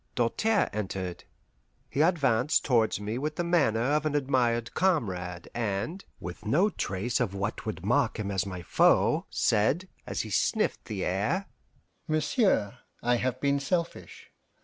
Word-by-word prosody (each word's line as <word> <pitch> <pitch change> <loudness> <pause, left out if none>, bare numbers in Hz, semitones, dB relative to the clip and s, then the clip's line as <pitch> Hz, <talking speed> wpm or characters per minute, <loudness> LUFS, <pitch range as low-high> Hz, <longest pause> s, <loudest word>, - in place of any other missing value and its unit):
Doltaire 200 - +2
entered. 95 -3 -4 0.6
He 140 - -1
advanced 150 -5 +2
towards 115 -6 +2
me 105 +4 -3
with 150 +2 -3
the 175 - -1
manner 145 -11 +2
of 150 -1 +2
an 155 -1 -1
admired 125 -4 +1
comrade, 90 - 0
and, 115 - -2 0.2
with 90 +1 -8
no 175 - +2
trace 100 - -2
of 105 -6 -1
what 100 +3 -3
would 90 -4 -4
mark 120 +2 +2
him 100 -2 -3
as 95 -2 0
my 90 -3 -6
foe, - - +3
said, 140 - +1 0.2
as - - -2
he - - -7
sniffed - - +1
the 100 -3 -3
air: 105 - 0 0.6
"Monsieur, 155 - +1 0.2
I 120 0 +3
have 130 +1 -1
been 140 0 +1
selfish. 170 +4 -3
120 Hz, 150 wpm, -28 LUFS, 100-150 Hz, 0.6 s, foe